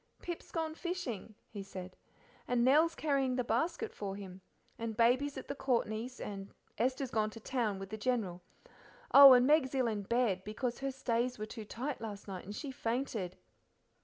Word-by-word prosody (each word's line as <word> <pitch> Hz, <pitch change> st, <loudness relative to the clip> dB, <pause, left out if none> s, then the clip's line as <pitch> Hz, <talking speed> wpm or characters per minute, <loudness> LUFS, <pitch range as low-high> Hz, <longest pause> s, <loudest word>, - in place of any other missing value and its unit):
"Pip's 345 Hz, -1 st, -6 dB
gone 320 Hz, -1 st, -2 dB
fishing," 315 Hz, -, -4 dB
he 205 Hz, -, -7 dB
said, 185 Hz, -1 st, -8 dB, 0.5 s
"and 245 Hz, -1 st, +2 dB
Nell's 315 Hz, +5 st, +5 dB
carrying 275 Hz, -4 st, +1 dB
the 250 Hz, -, 0 dB
basket 330 Hz, -, -1 dB
for 195 Hz, -2 st, -4 dB
him. 190 Hz, -2 st, -9 dB, 0.4 s
And 225 Hz, -1 st, -4 dB
Baby's 255 Hz, +5 st, +3 dB
at 265 Hz, -, -7 dB
the -, -, -3 dB
Courtneys', 250 Hz, -2 st, -1 dB
and 195 Hz, -1 st, -6 dB, 0.3 s
Esther's 255 Hz, +2 st, 0 dB
gone 215 Hz, -1 st, +1 dB
to 225 Hz, -, -10 dB
town 225 Hz, -4 st, -1 dB
with 195 Hz, +1 st, -8 dB
the 215 Hz, -, -4 dB
General. 205 Hz, -7 st, -1 dB, 0.7 s
Oh, 275 Hz, -1 st, +11 dB
and 250 Hz, 0 st, +6 dB
Meg's 285 Hz, -2 st, +3 dB
ill 260 Hz, -2 st, +2 dB
in 215 Hz, -3 st, -1 dB
bed, 205 Hz, -3 st, +1 dB
because 235 Hz, +4 st, -3 dB
her 275 Hz, 0 st, -1 dB
stays 250 Hz, -1 st, -1 dB
were 215 Hz, -, -4 dB
too 215 Hz, 0 st, -8 dB
tight 255 Hz, +6 st, -4 dB
last 210 Hz, -3 st, -6 dB
night 190 Hz, -2 st, -6 dB
and 205 Hz, +2 st, -7 dB
she 285 Hz, +2 st, -5 dB
fainted." 230 Hz, -7 st, -2 dB
240 Hz, 180 wpm, -33 LUFS, 210-270 Hz, 0.7 s, Oh